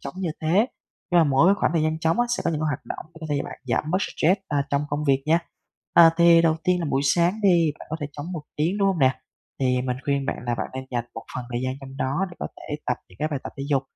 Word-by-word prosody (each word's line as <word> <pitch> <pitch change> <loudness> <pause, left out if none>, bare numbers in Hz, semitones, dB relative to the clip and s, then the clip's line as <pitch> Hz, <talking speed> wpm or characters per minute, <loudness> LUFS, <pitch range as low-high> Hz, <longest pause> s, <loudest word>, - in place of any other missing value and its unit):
trống 140 - -7
như 180 -4 -1
thế, 155 - 0 0.6
nhưng 175 -1 +5
mà - - +5
mỗi 140 +5 +4
cái 200 - +6
khoảng 190 - 0
thời 165 -2 +2
gian 155 0 0
trống 165 +8 +1
á, 240 - +2
sẽ - - -4
có - - +2
những 155 -2 -2
cái 155 - 0
hoạt 145 -1 -3
động - - -6
để 160 - -12
có 160 - -5
thể 145 - +1
cho - - -3
bạn - - -8
giảm 130 +6 0
bớt 185 - +2
stress, 185 0 +1
a, 145 -1 +1
trong 140 +1 +1
công 145 +1 -1
việc 135 -1 +2
nha. 165 +2 +4 0.6
À, 165 -1 +9
thì 170 -1 +6
đầu 160 -1 +3
tiên 180 -1 +2
là 165 - -2
buổi 135 0 +2
sáng 175 +4 +2
đi, 170 -6 +4
bạn - - -11
có 160 - -2
thể 145 - -2
trống 150 +6 -6
1 160 -4 -5
tiếng, 170 +7 0
đúng 200 -1 +3
hông 190 -4 0
nè? 130 -1 +3 0.4
Thì 125 -1 +2
mình 125 -1 -2
khuyên 140 -1 0
bạn - - -1
là 120 - +1
bạn - - -3
nên 130 0 -5
dành 120 -2 -1
một 115 - -6
phần 125 - -4
thời 120 - -1
gian 130 0 -1
trong 135 0 -10
đó 140 +10 0
để 175 - -13
có - - -3
thể 150 - -6
tập 125 - +1
những 90 - -18
cái 155 - 0
bài 145 -3 -2
tập - - -7
thể 140 - -5
dục. 135 -2 +3
155 Hz, 310 wpm, -24 LUFS, 135-170 Hz, 0.6 s, À